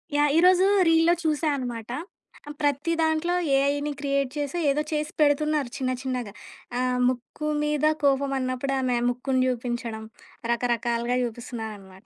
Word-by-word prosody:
Yeah! 290 0 +3
ఈరోజు 365 +2 +5 0.2
రీల్‌లో 330 +1 +5
చూసా 310 0 0
అనమాట. 240 -3 -5 0.7
ప్రతి 290 +3 +1
దాంట్లో 320 +2 +1 0.2
ఏఐని 285 +2 +1
క్రియేట్ 275 -2 0
చేసి, 290 +4 -2
ఏదో 295 +2 +1
చేసి 305 +1 -1
పెడుతున్నారు 295 -2 +2
చిన్న 260 -2 -1
చిన్నగా. 250 -5 -3 0.5
ఆహ్, 250 0 0
"ముక్కు 255 +4 -5 0.2
మీద 300 0 0 0.2
కోపం" 275 0 +2
అన్నప్పుడు 255 +1 -2
ఆమె 250 -2 +1
ముక్కుని 255 +1 0
జూపించడం, 240 -2 -3 0.5
రకరకాలుగా 235 0 0
జూపిస్తున్నారనమాట. 220 -4 -7
270 Hz, 125 wpm, -25 LUFS, 240-300 Hz, 0.7 s, ఈరోజు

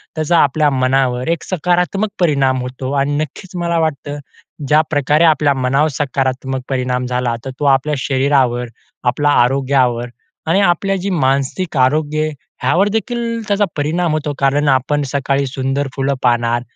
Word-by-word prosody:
त्याचा 155 +2 +1
आपल्या 150 +2 +2
मनावर 130 -1 +1
एक 170 - -6
सकारात्मक 180 +4 0
परिणाम 140 -6 +2
होतो 130 +1 -5
आणि 140 +1 0
नक्कीच 155 +5 -6
मला 170 0 0
वाटतं 145 -2 -2 0.5
ज्याप्रकारे 150 0 +2
आपल्या 150 -3 +4
मनावर 135 +3 +1
सकारात्मक 130 -1 -2
परिणाम 125 -1 -1
झाला 125 -1 -1
तर - - -4
तो 145 - -1
आपल्या 150 +3 -2
शरीरावर 130 -2 +1 0.4
आपल्या 145 +4 +1
आरोग्यावर 125 -2 +1 0.4
आणि 170 +5 +3
आपल्या 195 +1 +1
जे 200 - -1
मानसिक 140 +1 0
आरोग्य 150 +4 +1
आहे 155 0 -1 0.3
ह्यावर 180 +10 +3
देखील 230 +1 -2
त्याचा 205 0 +2
परिणाम 160 +4 0
होतो. 150 -1 -2
कारण 140 +2 +2
आपण 135 +3 +1
सकाळी 140 0 0
सुंदर 135 +2 -2
फुलं 135 0 0
पाहणार 120 -1 +2
140 Hz, 145 wpm, -17 LUFS, 130-155 Hz, 0.5 s, आपल्या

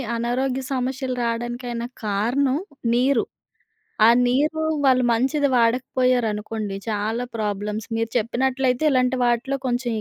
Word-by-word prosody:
ఆనారోగ్య 255 +3 -1
సమస్యలు 260 0 -2
రాడానికైనా 240 0 -3 0.2
కారణం 245 +7 +1 0.4
నీరు. 255 -1 +3 0.8
ఆ - - +8 0.2
నీరు 300 +5 +1 0.2
వాళ్ళు 255 -1 +4
మంచిది 270 +4 +1
వాడకపోయారనుకోండి, 230 -4 0
చాలా 220 +3 -1
ప్రాబ్లమ్స్. 210 0 -3
మీరు 225 0 -1
చెప్పినట్లయితే 255 +3 0
ఇలాంటి 255 0 +2
వాటిలో 240 +3 0
కొంచెం 245 0 -1
245 Hz, 100 wpm, -23 LUFS, 230-260 Hz, 0.8 s, ఆ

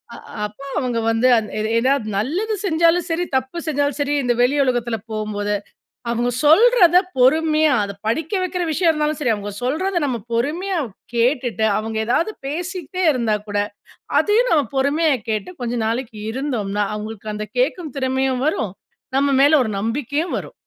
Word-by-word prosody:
அ - - -9 0.3
அப்போ 215 +7 -9
அவுங்க 245 -3 -1
வந்து 225 +3 +2
அது 215 -1 -2 0.3
ஏதாவது 260 -1 +1
நல்லது 350 - -1
செஞ்சாலும் 335 0 +3
சரி, 335 +2 0
தப்பு 260 +5 -4
செஞ்சாலும் 290 -1 0
சரி, 285 0 0
இந்த 245 -1 +2
வெளி 250 +4 +3
உலகத்தில 240 -3 0
போம்போது, 210 -1 -2 0.6
அவுங்க 240 +1 0
சொல்றத 360 +2 +6 0.2
பொறுமையா, 310 +3 +4
அதை 200 0 -6
படிக்க 315 - -1
வைக்கிற 360 -1 -2
விஷயம் 330 +2 +3
இருந்தாலும் 305 0 -1
சரி. 245 -6 +2
அவுங்க 205 0 -6
சொல்றத 350 +9 -1
நம்ம 245 -3 -2
பொறுமையா 335 +11 -1 0.4
கேட்டுட்டு, 240 -2 +1
அவுங்க 220 0 -3
ஏதாவது 335 - +1
பேசிக்ட்டே 360 +3 -3
இருந்தா 230 -4 0
கூட, 205 - -1 0.6
அதையும் 460 +4 +2
நாம 300 -3 +4
பொறுமையா 290 +4 +2 0.2
கேட்டு 215 - -2
கொஞ்ச 240 0 -2
நாளைக்கு 230 -1 -3
இருந்தோம்ன்னா, 215 -7 -2
அவுங்களுக்கு 215 0 -6
அந்த 215 0 -5
கேட்கும் 360 - -1
திறமையும் 260 0 0
வரும். 215 - -1 0.4
நம்ம 280 +1 +2
மேல 290 - +5
ஒரு 220 - -3
நம்பிக்கையும் 285 - -2
வரும். - - -10
265 Hz, 150 wpm, -20 LUFS, 225-320 Hz, 0.6 s, சொல்றத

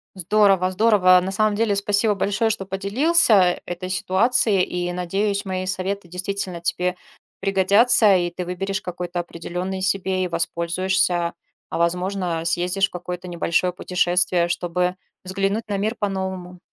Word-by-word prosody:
Здорово 190 0 +3
здорово. 185 -3 +5
На 190 - -3
самом 215 +1 +1
деле 215 -1 +1
спасибо 205 +1 +1
большое, 205 +3 0
что 210 -3 -2
поделился 200 - +3
этой 180 +1 -6
ситуацией, 195 +2 +2
и 175 0 -3
надеюсь, 195 +3 -1
мои 185 -1 -3
советы 185 +1 -3
действительно 180 0 -4
тебе 180 +1 -1 0.4
пригодятся, 200 +3 +4
и 175 -1 0
ты 180 +1 -5
выберешь 195 +3 -3
какой-то 180 0 -5
определенный 180 +2 -5
себе 190 0 0
и - - -1
воспользуешься, 170 +1 0 0.4
а - - -4
возможно, 180 0 -1
съездишь 180 +4 +1
в - - -27
какое-то 180 0 -6
небольшое 175 +1 0
путешествие, 180 -1 +1
чтобы 180 +1 -1 0.3
взглянуть 195 +4 -2
на 205 -1 -2
мир 215 +4 -1
по-новому. 190 -3 -4
185 Hz, 135 wpm, -22 LUFS, 180-200 Hz, 0.4 s, здорово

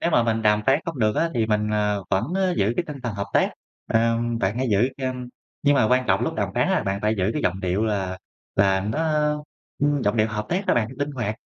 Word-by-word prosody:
nếu 170 - +1
mà 120 - +4
mình 115 -1 0
đàm 105 0 +3
phán 135 +2 +5
không 165 -5 -5
được 110 -2 +1
á 165 - +1
thì 115 -2 +1
mình, 105 -1 0
ờ, 105 -2 0
vẫn 95 - +2 0.3
giữ 100 +3 +2
cái 180 - 0
tinh 150 - -6
thần 120 -4 -3
hợp 100 0 -3
tác. - - +3 0.4
Ờm, 115 +1 +1
bạn 100 0 0
hãy 130 - 0
giữ 105 +5 +3
chăm 130 -2 -4 0.3
nhưng 145 0 +4
mà 130 - +4
quan 125 +1 +3
trọng - - +2
lúc - - -1
đàm - - -1
phán - - +2
á - - +2
bạn 95 0 -1
phải 105 +1 +2
giữ 95 +3 +1
cái 150 - -2
giọng 95 +2 0
điệu 95 +3 0
là 95 -4 -2 0.4
là 95 -1 +3
nó 105 +6 -2 0.8
ưm, 145 -1 +2
giọng 105 +2 +1
điệu 110 -1 +3
hợp 105 0 -4
tác 190 +4 -1
á - - +3
bạn, 115 -2 +1
linh 145 +1 -1
hoạt. 120 -6 -3
110 Hz, 255 wpm, -24 LUFS, 105-130 Hz, 0.8 s, phán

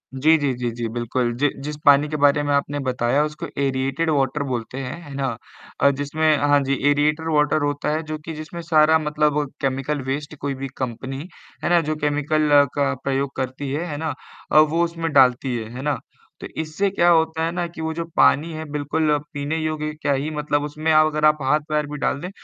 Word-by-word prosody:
जी, 155 +4 +4
जी, 140 -3 0
जी, 120 -1 -2
जी। 115 0 -4
बिल्कुल, 120 +1 -1
जि 145 +1 +2
जिस 150 0 -4
पानी 145 +1 +6
के 155 - -3
बारे 145 +1 +3
में 145 0 0
आपने 145 +1 0
बताया 125 +3 +1
उसको 150 0 -5 0.2
एरिएटेड 135 +4 0
वाटर 140 0 +1
बोलते 125 -1 -4
हैं, 125 +4 -5
है 145 -2 -10
ना? 135 -1 -1 0.5
अ, 140 - +6
जिसमें 155 +2 +2
हाँ 145 0 +3
जी 135 +1 0 0.2
एरिएटेड 150 +2 +1
वाटर 150 +1 +2
होता 145 0 -1
है, 160 - -1
जो 155 0 -5
कि 160 - -5
जिसमें 155 +3 -7
सारा 160 -1 +4
मतलब 150 -1 +1 0.2
केमिकल 135 +2 -1
वेस्ट 145 +2 -3
कोई 140 -1 -2
भी - - -2
कंपनी, 135 +5 -5 0.4
है - - +1
ना? 175 -1 +5
जो 155 0 -2
केमिकल 150 +1 0 0.3
का 140 -1 +1
प्रयोग 135 0 -1
करती 130 +1 -4
है, 160 +5 -2
है 145 - -4
ना? 160 -1 -2 0.5
वो 165 +3 +2
उसमें 165 -1 -2
डालती 130 -1 +4
है, 110 -1 -6
है 130 - -5
ना? 145 0 -1 0.4
तो - - -5
इससे 160 +6 -1
क्या 175 -2 +2
होता 160 -1 +2
है 165 - -1
ना 175 0 -2
कि 165 -1 -9
वो 160 0 -2
जो 170 +1 -3
पानी 160 +4 +4
है 155 0 -5
बिल्कुल 150 +1 0 0.2
पीने 145 +3 -2
योग्य 155 -1 -2
क्या 145 - +1
ही 140 +3 -1
मतलब 150 -1 -1
उसमें 155 +2 -1
अगर 155 0 +3
आप 150 0 +5
हाथ-पैर 150 +2 +1
भी 150 - -4
डाल 140 - 0
दें, 180 - -5
150 Hz, 210 wpm, -22 LUFS, 140-155 Hz, 0.5 s, पानी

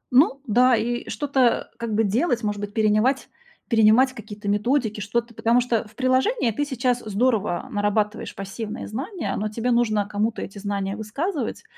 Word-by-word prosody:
Ну 275 0 +5
да, 250 +3 +4
и 240 +2 -2
что-то 265 -4 +1
как 230 -2 -3
бы 225 - +3
делать, 235 - +1
может 210 -1 -2
быть, 205 0 -5
перенимать 220 +5 +2 0.4
перенимать 230 +3 +5
какие-то 210 -3 -9
методики, 215 +1 +1
что-то. 235 +4 -2
Потому 230 +2 +2
что 235 -2 0
в 215 - -21
приложении 260 - +2
ты 290 +7 -1
сейчас 250 -3 0
здорово 215 -2 0
нарабатываешь 205 +1 -1
пассивные 205 +2 -6
знания, 320 - -4
но 215 - -1
тебе 230 +3 -1
нужно 215 -4 +2
кому-то 215 +2 -1
эти 200 +1 -8
знания 200 -1 -2
высказывать, 265 - -3
225 Hz, 160 wpm, -23 LUFS, 210-255 Hz, 0.4 s, Ну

